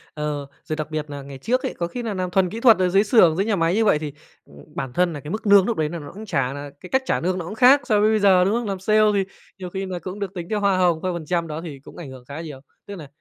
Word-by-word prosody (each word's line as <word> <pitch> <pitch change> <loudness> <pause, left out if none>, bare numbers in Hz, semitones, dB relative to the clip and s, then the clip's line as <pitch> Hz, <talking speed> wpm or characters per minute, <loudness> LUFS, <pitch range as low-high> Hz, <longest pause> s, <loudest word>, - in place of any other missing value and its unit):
Ờ, 150 -2 -3 0.2
rồi 155 0 -4
đặc 155 0 -5
biệt 155 -1 -4
nà 145 -1 -6
ngày 135 0 -10
trước 250 - -1
ấy, - - -2
có 170 - -2
khi 245 +6 -6
nà 220 - -3
làm 185 -2 -3
thuần 185 0 +2
kỹ 220 +5 -6
thuật 230 -3 +6
ở 180 -1 +2
dưới 195 +3 +4
xưởng, 195 -7 +5
dưới 195 - +1
nhà 220 - +1
máy 165 0 +1
như 220 0 +2
vậy 150 - +3
thì, 150 -2 -6 0.3
ừm, - - -19 0.2
bản 130 -2 -4
thân 180 -1 +1
nà 145 - -6
cái 150 +3 -8
mức 215 0 -4
lương 200 -1 +7
núc 235 - -1
đấy 155 -1 0
nà 170 - -5
nó 145 - -9
cũng 210 +4 -9
trả 135 -9 -1
là 145 0 -7
cái 180 - -11
cách 265 +6 +2
trả - - 0
lương 185 +2 -1
nó 170 - -5
cũng 205 - -7
khác 260 +4 +6
so 215 -4 +2
với 215 - +4
bây 220 - +2
giờ, 190 -3 +5
đúng 200 - +1
không? 235 -2 -1
Làm 195 -2 -3
sale 215 +3 +2
thì 195 -1 +2 0.4
nhiều 180 - -6
khi 190 +2 -4
là 185 -2 -5
cũng 185 +3 -7
được 200 -2 -4
tính 175 -3 -6
theo 210 -1 0
hoa 200 -2 +2
hồng, 175 -3 +2
theo 185 - -1
phần 170 -2 -6
trăm, 170 +1 -1
đó 155 +1 -5
thì 150 -5 -8
cũng - - -15
ảnh 160 -6 -8
hưởng 130 -2 -12
khá 140 +4 -7
nhiều, 150 -5 -8 0.3
tức 200 - -8
nà 155 -6 -9
180 Hz, 340 wpm, -22 LUFS, 155-205 Hz, 0.4 s, lương